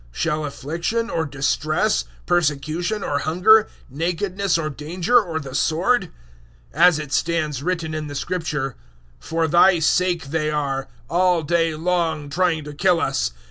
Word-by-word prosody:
Shall 155 - -1
affliction 170 - -3
or 160 -2 -1
distress, 155 +8 0 0.2
persecution 175 +4 0
or 145 - -1
hunger, 200 +8 +4 0.2
nakedness 180 +5 -1
or 160 -2 -2
danger 175 - +1
or 165 -6 -4
the 135 -4 -8
sword? 180 - +1 0.6
008:036 155 - -9
As 175 -3 +7
it 150 -3 -6
stands 155 -3 0
written 165 -1 -2
in 155 -1 -4
the 145 - -7
Scripture, 150 -6 -3 0.4
"For 165 0 -1
Thy 175 +3 +5
sake 170 -1 +1
they 155 -1 0
are, 140 -3 -2 0.2
all 175 0 +2
day 165 0 +1
long, 160 -3 -1
trying 170 -1 +1
to 150 0 -8
kill 175 +3 +2
us. 135 -4 0
165 Hz, 145 wpm, -22 LUFS, 150-180 Hz, 0.6 s, As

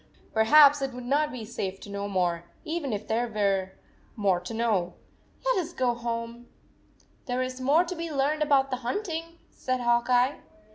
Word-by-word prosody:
Perhaps 285 +6 +6
it 270 -1 -2
would 250 0 -8
not 295 +4 +1
be 245 -4 -6
safe 195 -4 -4
to - - -10
know 200 0 -3
more, 175 -3 0 0.2
even 320 -4 -3
if 210 0 -4
there 235 +2 0
were 195 -3 0 0.4
more 195 -5 +2
to 180 - -8
know! 210 -6 0 0.5
Let - - +2
us 345 -1 -4
go 250 -2 +1
home/ 235 0 -5 0.4
" - - -34
There 250 0 0
is 255 0 -5
more 290 +7 +4
to 360 +1 -5
be 335 0 -4
learned 290 +2 0
about 275 -2 +3
the 255 - 0
hunting," 330 - -4
said 255 0 -2
Hawk 240 0 +2
Eye. 250 +3 +3
245 Hz, 185 wpm, -27 LUFS, 215-290 Hz, 0.5 s, Perhaps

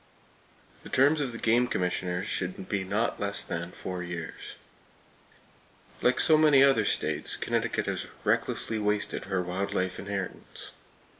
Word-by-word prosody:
The - - -11
terms 145 +4 +4
of 135 -3 -1
the 115 - -6
game 120 +2 +3
commissioners 90 -2 -1
should 95 0 -4
be 100 -2 -1
not 105 +5 -1
less 100 0 -2
than - - -4
four 90 -1 -5
years. 85 -2 -6 1.5
Like 125 - +3
so 155 -1 +5
many 150 -3 +7
other 135 -1 +4
states, - - 0
Connecticut - - -1
has - - -3 0.2
recklessly 110 - 0
wasted 105 0 -1
her 95 -2 -1
wild 95 +3 -3
life 95 -1 -1
inheritance. 100 -1 -6
100 Hz, 140 wpm, -28 LUFS, 90-125 Hz, 1.5 s, many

